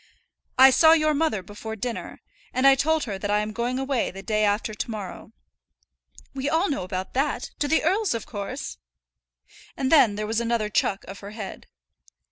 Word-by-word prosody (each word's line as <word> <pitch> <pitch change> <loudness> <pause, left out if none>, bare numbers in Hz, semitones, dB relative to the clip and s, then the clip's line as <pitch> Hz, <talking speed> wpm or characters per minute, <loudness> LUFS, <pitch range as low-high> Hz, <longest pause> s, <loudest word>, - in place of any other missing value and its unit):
"I 265 +1 +9
saw 320 +5 +6
your 310 -1 +3
mother 295 - 0
before 210 +3 -7
dinner, 235 +2 -5 0.3
and 255 +1 +2
I 275 - +9
told 310 +3 +1
her 200 -5 -4
that 205 - -3
I 210 0 +2
am 210 0 -4
going 240 +3 -2
away 270 -2 0
the 195 +1 -9
day 215 +2 0
after 210 +1 0
to 215 - -4
morrow." 205 -5 -7 1.0
"We 275 +1 -2
all 325 +3 +1
know 280 - -2
about 185 +1 -5
that; 275 +2 -1
to 290 - 0
the 320 +3 +2
earl's, 380 - +1
of 225 - -4
course!" 220 +6 -6 1.0
And 265 -1 -1
then 245 -10 +6
there 210 +1 -3
was 220 +1 0
another 230 -2 0
chuck 195 -1 0
of 195 - -8
her 200 - -9
head. 200 -3 -7
235 Hz, 190 wpm, -25 LUFS, 210-280 Hz, 1.0 s, I